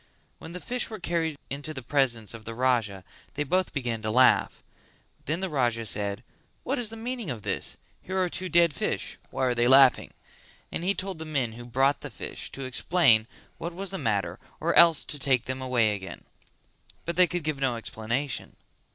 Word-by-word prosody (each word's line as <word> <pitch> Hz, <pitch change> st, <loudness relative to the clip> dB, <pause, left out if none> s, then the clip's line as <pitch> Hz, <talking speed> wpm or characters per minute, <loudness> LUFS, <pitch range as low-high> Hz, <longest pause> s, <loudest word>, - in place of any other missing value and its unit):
When 160 Hz, -, -9 dB
the 180 Hz, -, -5 dB
fish 250 Hz, +6 st, -1 dB
were 220 Hz, -, -6 dB
carried 165 Hz, -3 st, -1 dB
into 145 Hz, +3 st, -4 dB
the 130 Hz, -, -6 dB
presence 120 Hz, -6 st, 0 dB
of 115 Hz, -1 st, -9 dB
the 115 Hz, +1 st, -7 dB
Raja 115 Hz, -6 st, +1 dB, 0.3 s
they 150 Hz, -, 0 dB
both 185 Hz, +6 st, 0 dB
began 120 Hz, -6 st, -2 dB
to 110 Hz, -, -2 dB
laugh: 125 Hz, +4 st, +4 dB, 0.6 s
then 160 Hz, +5 st, -1 dB
the 190 Hz, -, -1 dB
Raja 120 Hz, -6 st, 0 dB
said 100 Hz, +2 st, -2 dB, 0.4 s
"What 265 Hz, +1 st, -1 dB
is 235 Hz, -3 st, -1 dB
the 225 Hz, -, -7 dB
meaning 235 Hz, -, -4 dB
of 115 Hz, -5 st, -5 dB
this? -, -, -2 dB, 0.2 s
Here 190 Hz, +1 st, -4 dB
are 185 Hz, -1 st, +2 dB
two 185 Hz, +1 st, -4 dB
dead 170 Hz, -3 st, +4 dB
fish, -, -, -3 dB
why 130 Hz, -, -1 dB
are 125 Hz, -, +2 dB
they 120 Hz, 0 st, +2 dB
laughing?" 135 Hz, 0 st, +6 dB, 0.6 s
And -, -, -4 dB
he 195 Hz, +2 st, +2 dB
told 190 Hz, -3 st, -4 dB
the -, -, -4 dB
men 135 Hz, -7 st, -1 dB
who 120 Hz, +2 st, -10 dB
brought 135 Hz, +4 st, +2 dB
the -, -, -6 dB
fish -, -, -5 dB
to 135 Hz, -, -6 dB
explain 130 Hz, -4 st, +3 dB, 0.3 s
what 170 Hz, 0 st, -5 dB
was 195 Hz, 0 st, -2 dB
the 195 Hz, -, -3 dB
matter 100 Hz, -, -1 dB, 0.2 s
or 170 Hz, +2 st, +1 dB
else 170 Hz, -3 st, +7 dB
to 145 Hz, -, -3 dB
take 130 Hz, -3 st, +2 dB
them 130 Hz, 0 st, -4 dB
away 120 Hz, -5 st, +2 dB
again. 95 Hz, -2 st, -7 dB, 0.8 s
But 170 Hz, -, -2 dB
they 180 Hz, 0 st, +6 dB
could 175 Hz, -2 st, -3 dB
give 150 Hz, -2 st, -2 dB
no 130 Hz, -3 st, +1 dB
explanation. 115 Hz, +4 st, -3 dB
135 Hz, 200 wpm, -27 LUFS, 120-170 Hz, 0.8 s, else